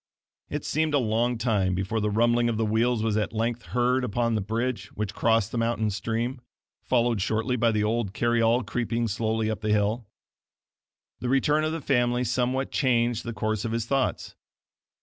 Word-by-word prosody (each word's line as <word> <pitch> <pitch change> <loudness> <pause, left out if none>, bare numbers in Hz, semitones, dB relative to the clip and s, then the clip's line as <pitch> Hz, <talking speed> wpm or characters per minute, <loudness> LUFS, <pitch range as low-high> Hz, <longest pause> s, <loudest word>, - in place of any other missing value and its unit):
It - - -4
seemed 155 -1 0
a - - +5
long 120 0 +1
time 105 -6 +1
before 95 +4 -1
the 105 0 0
rumbling 120 +2 +2
of 115 - -1
the 110 - +1
wheels 110 +1 +1
was 110 -1 +1
at 105 - -1
length 115 +2 -1
heard 125 +1 +1
upon 115 0 0
the 110 - 0
bridge 110 0 -2
which 105 -1 -3
crossed 115 -2 +2
the 120 - -2
mountain 115 -2 0
stream, 115 +5 -3 0.4
followed 120 -4 +1
shortly 110 +4 0
by 120 -1 +2
the 105 -2 +1
old 110 -2 0
carry 120 +2 +1
all 115 +2 +3
creeping 120 +1 -1
slowly 110 +1 -1
up 110 -1 -3
the 105 - -2
hill. 105 +2 +1 1.1
The 125 - -3
return 145 +3 +2
of 155 - 0
the 165 -1 -4
family 120 -2 +1
somewhat 125 +2 -1
changed 120 -4 +1
the 115 - -3
course 110 -1 -2
of 115 -1 -2
his 115 -1 -1
thoughts. 135 +1 -1
115 Hz, 190 wpm, -26 LUFS, 110-120 Hz, 1.1 s, a